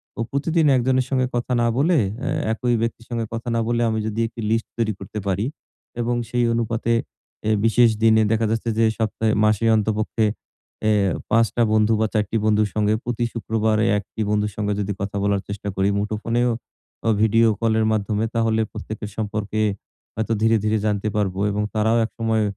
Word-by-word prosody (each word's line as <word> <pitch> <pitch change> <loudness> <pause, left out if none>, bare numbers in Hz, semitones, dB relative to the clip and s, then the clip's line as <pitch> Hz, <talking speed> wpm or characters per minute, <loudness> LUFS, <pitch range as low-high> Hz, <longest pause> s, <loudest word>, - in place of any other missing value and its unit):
প - - -34
প্রতিদিন 160 +3 +1
১ 125 - +2
জনের 130 -1 +3
সঙ্গে 130 -2 +1
কথা 120 +1 -2
না 120 - +3
বলে 165 +5 +3 0.2
অ্যা - - -2 0.2
একই 120 +1 0
ব্যক্তির 115 0 -3
সঙ্গে 115 -2 -2
কথা 115 +2 -5
না - - +2
বলে 120 0 +1
আমি 110 0 -1
যদি 110 +1 -3
একটা 115 0 -9
লিস্ট 115 0 0
তৈরি 115 -2 0
করতে 100 +2 -6
পারি 100 +2 0 0.6
এবং 120 +1 0
সেই 120 0 +1
অনুপাতে 115 0 -1 0.6
এ - - +3
বিশেষ 115 +1 +5
দিনে 110 -1 +5
দেখা 110 0 +2
যাচ্ছে 115 +1 -1
যে 115 - +5
সপ্তাহে 110 0 0
মাসে 110 +1 +2
অন্ততপক্ষে 110 +1 0 0.6
এ - - +4 0.4
৫ 115 +1 +5
টা 120 - +3
বন্ধু 110 +1 +3
বা 110 - +2
৪ 105 -2 +2
টি 115 - 0
বন্ধুর 105 -1 +3
সঙ্গে 105 0 +2
প্রতি 120 0 -1
শুক্রবারে 110 -1 0
১ 100 - -3
টি - - -4
বন্ধুর 105 0 0
সঙ্গে 105 -1 -1
যদি 100 0 -2
কথা 100 0 -4
বলার 100 -1 +1
চেষ্টা 100 0 -5
করি 95 +1 +2
মুঠোফোনেও 115 +4 0 0.6
অ - - +4
ভিডিও 115 +1 +4
কলের 110 -1 +2
মাধ্যমে 105 0 0
তাহলে, 115 -1 +2
প্রত্যেকের 105 -1 -6
সম্পর্কে 105 0 -2 0.5
হয়তো 110 +1 -1
ধীরে, 115 +1 +4
ধীরে 110 +1 +2
জানতে 105 0 0
পারবো। 95 -3 -1
এবং 105 +1 -1
তারাও 110 +2 +2
একসময় 110 -1 -1
110 Hz, 185 wpm, -22 LUFS, 105-115 Hz, 0.6 s, বিশেষ